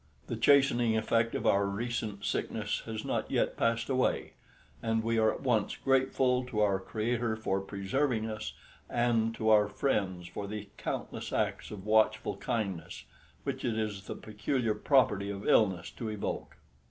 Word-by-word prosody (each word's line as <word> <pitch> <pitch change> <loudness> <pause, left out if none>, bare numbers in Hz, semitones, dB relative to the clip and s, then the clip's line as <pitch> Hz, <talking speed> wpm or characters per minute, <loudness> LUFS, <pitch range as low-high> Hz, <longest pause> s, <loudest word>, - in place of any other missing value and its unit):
The - - -3
chastening 120 -5 +4
effect 115 +1 +1
of - - -2
our 100 0 +4
recent 105 -1 -3
sickness - - -1
has 110 -1 -4
not - - -1
yet - - +1
passed 115 0 +1
away, 130 -1 0 0.5
and 115 0 0
we 115 0 +1
are 110 -1 +4
at - - -6
once 115 -6 +1
grateful 130 -1 +2
to 115 -4 -3
our 100 -2 +3
Creator 115 +3 -1
for 95 -3 -1
preserving 110 +5 -1
us, 110 -1 -5 0.4
and 115 -2 +1
to 110 -1 0
our 105 -1 +6
friends 95 -6 -1
for 100 +3 -6
the 105 -1 -6
countless - - -4
acts - - -1
of 100 -2 -8
watchful 110 0 +2
kindness 100 -7 -3 0.4
which 135 -1 -3
it 115 -3 0
is 105 -3 -3
the - - -4
peculiar 110 +2 -1
property 105 -7 +2
of 100 0 -5
illness 95 -5 +3
to 115 - -5
evoke. 105 -2 -4
110 Hz, 160 wpm, -31 LUFS, 100-120 Hz, 0.5 s, our